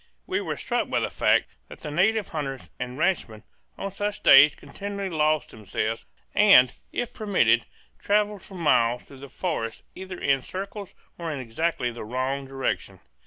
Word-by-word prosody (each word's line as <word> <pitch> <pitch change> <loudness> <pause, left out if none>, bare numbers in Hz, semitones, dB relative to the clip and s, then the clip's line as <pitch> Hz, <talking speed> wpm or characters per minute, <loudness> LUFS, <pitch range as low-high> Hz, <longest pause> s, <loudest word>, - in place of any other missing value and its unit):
We - - -1
were - - -3
struck - - -1
by - - +1
the - - -2
fact - - +2 0.2
that - - -12
the 150 - -5
native 200 +6 +2
hunters 135 -4 -5
and 125 +1 -5
ranchmen 155 - -1 0.3
on 195 - -4
such 205 +1 -3
days 140 +2 +8
continually 200 -1 -6
lost 155 -1 +1
themselves 110 +1 -3 0.3
and, 195 - +7 0.2
if 245 0 -3
permitted, 210 -3 +2 0.3
travelled 210 -1 +1
for 195 - -13
miles 125 -8 +2
through 135 - -14
the 140 0 -10
forest 120 - -3
either 185 -1 -8
in 135 -1 +2
circles 195 - -7 0.2
or 165 -1 -3
in 145 - -4
exactly 125 +1 -1
the 115 - -8
wrong 130 +4 -2
direction. 135 0 -3
155 Hz, 165 wpm, -26 LUFS, 130-195 Hz, 0.3 s, days